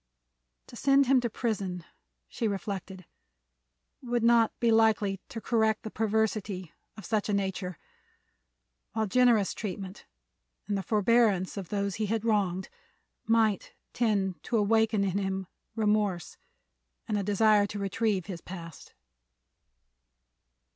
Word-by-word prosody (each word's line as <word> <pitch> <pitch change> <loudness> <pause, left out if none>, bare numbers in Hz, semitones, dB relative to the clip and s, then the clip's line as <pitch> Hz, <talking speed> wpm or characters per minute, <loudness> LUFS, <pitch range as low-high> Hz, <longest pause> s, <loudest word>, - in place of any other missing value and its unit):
To - - -13
send 275 +2 +4
him 260 0 +4
to 240 - -1
prison, 200 -6 -3 0.4
she 230 - -2
reflected, 195 -2 -5 1.0
would 240 -2 -1
not 230 -1 +5
be 235 -1 +3
likely 215 -3 +3
to 230 - -6
correct 220 -2 +1
the 220 - -6
perversity 215 -4 -1 0.2
of 215 - -9
such 215 0 -1
a - - +1
nature, 190 -3 -3 1.2
while 220 -1 0
generous 230 -2 +3
treatment 195 -1 -6 0.6
and 205 - -1
the 195 - -1
forbearance 210 -2 +2
of 195 -4 -6
those 200 -1 -2
he 215 -1 -1
had 225 +1 -1
wronged 195 -4 +1 0.6
might 225 -3 +2 0.2
tend 200 -6 0
to 235 - 0
awaken 220 0 +2
in 195 0 0
him 190 -1 -2 0.3
remorse 210 -5 0 0.7
and 215 - -1
a 205 - +1
desire 205 +1 +4
to 205 - -6
retrieve 200 -1 -1
his 180 -4 -7
past. 170 -3 -10
210 Hz, 125 wpm, -29 LUFS, 195-225 Hz, 1.2 s, not